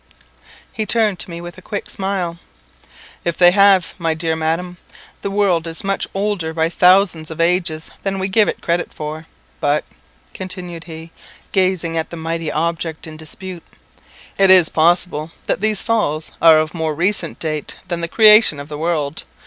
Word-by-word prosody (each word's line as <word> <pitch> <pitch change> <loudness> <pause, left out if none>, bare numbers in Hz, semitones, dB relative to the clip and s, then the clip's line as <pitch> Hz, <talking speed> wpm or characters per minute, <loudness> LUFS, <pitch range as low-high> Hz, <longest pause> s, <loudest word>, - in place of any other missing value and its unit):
He 215 -1 -3
turned 215 -5 +1
to - - -6
me 170 0 -7
with 175 +1 -9
a - - -16
quick 205 +2 -5
smile 190 -3 -3 0.8
"If 170 -1 -2
they 175 -1 +7
have, 195 -2 +4
my 165 -2 0
dear 160 0 -1
Madam, 165 +3 -2 0.4
the - - -3
world 195 -5 +1
is 165 0 -6
much 195 0 -1
older 195 -5 -1
by 160 0 +1
thousands 180 -3 +3
of 160 - -8
ages 170 -2 0
than 195 -1 -2
we 190 0 -1
give 205 +2 +3
it - - -5
credit 170 +1 -1
for; 155 +1 -7 0.3
but 145 +1 +1 0.3
" - - -34
continued 180 -3 -7
he, 165 0 -10 0.4
gazing 185 -4 0
at 160 - -2
the 170 - -8
mighty 165 -1 -3
object 165 0 -2
in 160 -1 -9
dispute, 175 +3 -8 0.8
"it 195 -1 +5
is 185 -4 +7
possible 165 -1 +1
that - - -1
these 215 -1 +2
Falls 160 -9 -1
are 165 -1 +8
of 155 0 0
more 160 -3 -2
recent 185 +6 -1
date 155 -2 -4
than 170 -1 -3
the 170 - -2
creation 215 -5 +6
of 145 +1 -9
the 150 -1 -6
world. 155 -3 -2
170 Hz, 175 wpm, -18 LUFS, 160-190 Hz, 0.8 s, are